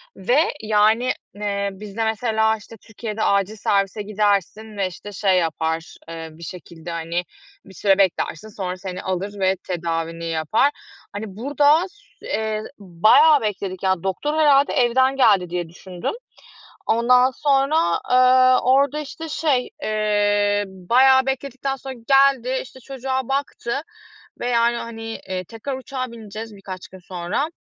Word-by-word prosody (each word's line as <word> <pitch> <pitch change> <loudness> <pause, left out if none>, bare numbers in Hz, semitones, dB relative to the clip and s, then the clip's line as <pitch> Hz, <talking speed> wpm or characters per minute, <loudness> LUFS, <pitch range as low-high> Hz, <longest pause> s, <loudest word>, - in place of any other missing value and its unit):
ve, 245 +10 +2 0.2
yani, 220 +3 +3 0.2
eee, 200 -1 -2
bizde 210 +3 -5
mesela, 220 0 +1
işte, 215 +2 -13
Türkiye'de 220 0 -6
acil 200 +1 +1
servise 200 0 0
gidersin 210 +1 -1
ve, 195 -2 +1
işte, 195 +3 -9
şey 195 -1 +2
yapar, 160 0 -2
eee, 165 -1 -7
bir 165 +2 -13
şekilde, 170 0 -9
hani, 170 +1 -2 0.4
bir 190 - -14
süre 195 +1 +2
beklersin, 190 0 0
sonra 185 -3 -5
seni 185 -1 -6
alır 195 +2 -4
ve 190 0 +2
tedavini 165 -1 -3
yapar. 165 - +1 0.4
Hani, 205 +2 -4
burada 290 +7 +3
ss 410 +2 -25
eee, 215 0 -2 0.2
bayağı 215 - +5
bekledik, 195 -3 -4
ya. 190 -2 +1
Doktor 195 +11 -2
herhalde 285 -2 +4
evden 260 0 +3
geldi 200 -9 +4
diye 175 -1 -3
düşündüm. 180 - -6 0.7
Ondan 250 +3 +4
sonra, 275 +2 +1 0.4
ııı, 255 0 +6
orada, 275 +3 +3
işte, 310 +2 -7
şey, 285 -5 0
eee, 205 -1 +1
bayağı 250 +8 +4
bekledikten 270 0 -3
sonra 265 0 -8
geldi, 270 -2 +4
işte, 260 0 -14
çocuğa 260 0 -4
baktı 275 -2 -2 0.6
ve, 245 - -2
yani, 235 0 +2
hani, 230 -1 -7 0.3
eee, 185 -1 -2
tekrar 230 +8 -6
uçağa 260 0 -4
bineceğiz 220 -1 -8
birkaç 185 -2 -8
gün 190 - -13
sonra 180 - -3
215 Hz, 140 wpm, -22 LUFS, 190-255 Hz, 0.7 s, ııı